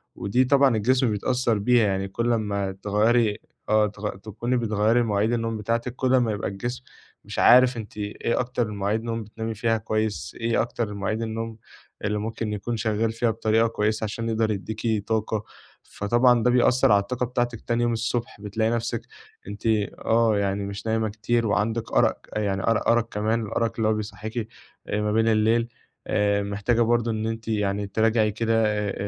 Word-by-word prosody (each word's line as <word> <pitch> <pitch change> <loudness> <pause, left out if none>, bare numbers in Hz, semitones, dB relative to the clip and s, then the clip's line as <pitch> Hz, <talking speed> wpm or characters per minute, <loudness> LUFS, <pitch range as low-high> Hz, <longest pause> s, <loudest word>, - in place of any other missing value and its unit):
ودي 120 +6 +1
طبعًا 135 -2 +4
الجسم 125 +2 +2
بيتأثر 120 +2 0
بيها، 115 +2 +3
يعني 95 0 -1
كل 115 +5 -1
اما 100 -3 -1
تغيري 105 +3 +1 0.3
آه، 110 0 +4
تغ 105 +1 -5
تكوني 110 +5 -3
بتغيري 110 +1 +2
مواعيد 105 +1 +1
النوم 115 -1 -1
بتاعتِك، 115 +3 -2
كل 130 0 +1
اما 120 -4 +2
يبقى 105 - -3
الجسم 120 +6 -5 0.4
مش - - -5
عارف 125 0 +6
أنتِ 110 -2 -8
إيه 105 +3 -2
أكتر 125 -2 -1
المواعيد 105 +2 -2
نوم 115 -1 -3
بتنامي 110 +2 -5
فيها 115 +1 0
كويس؟ 110 -1 -2
إيه 115 0 +2
أكتر 115 -1 -2
المواعيد 105 +2 -3
النوم 115 0 -4 0.5
اللي 105 0 0
ممكن 110 0 -3
يكون 110 +3 -3
شغال 110 0 0
فيها 115 +1 0
بطريقة 110 +1 +2
كويسة 110 0 -1
علشان 115 +2 -3
يقدر 110 -1 +1
يديكِ 110 +1 -2
طاقة؟ 110 -1 -1 0.4
فطبعًا 120 +3 +2
ده 125 - +4
بيأثر 125 -1 +4
على 100 - +5
الطاقة 125 +4 -2
بتاعتِك 120 -2 -2
تاني 120 0 0
يوم 120 0 +1
الصبح، 115 -2 -3
بتلاقي 110 +2 -1
نفسِك 115 0 -2 0.5
أنتِ 105 +2 -8 0.4
آه، 115 -2 +3
يعني 100 0 -1
مش 100 +1 -7
نايمة 110 0 +1
كتير 115 +2 0
وعندِك 110 +2 -1
أرق، - - +3 0.2
يعني 100 -2 -1
أر 115 -1 +1
أرق 115 -1 +3
كمان 110 +2 0
الأرق 115 +2 -1
اللي 110 -2 +1
هو 110 - +3
بيصحيكِ 110 +1 -5 0.4
آآ 105 +1 -1
ما 105 0 0
بين 110 +1 +2
الليل. 115 +1 +3 0.4
آآ، 100 0 +1
محتاجة 105 +4 0
برضو 120 0 +2
إن 110 0 -2
أنتِ 115 0 -5
يعني 105 -2 -1
تراجعي 110 +1 +2
كده 115 +1 +1
آآ، 105 -2 -1
110 Hz, 175 wpm, -25 LUFS, 105-115 Hz, 0.5 s, عارف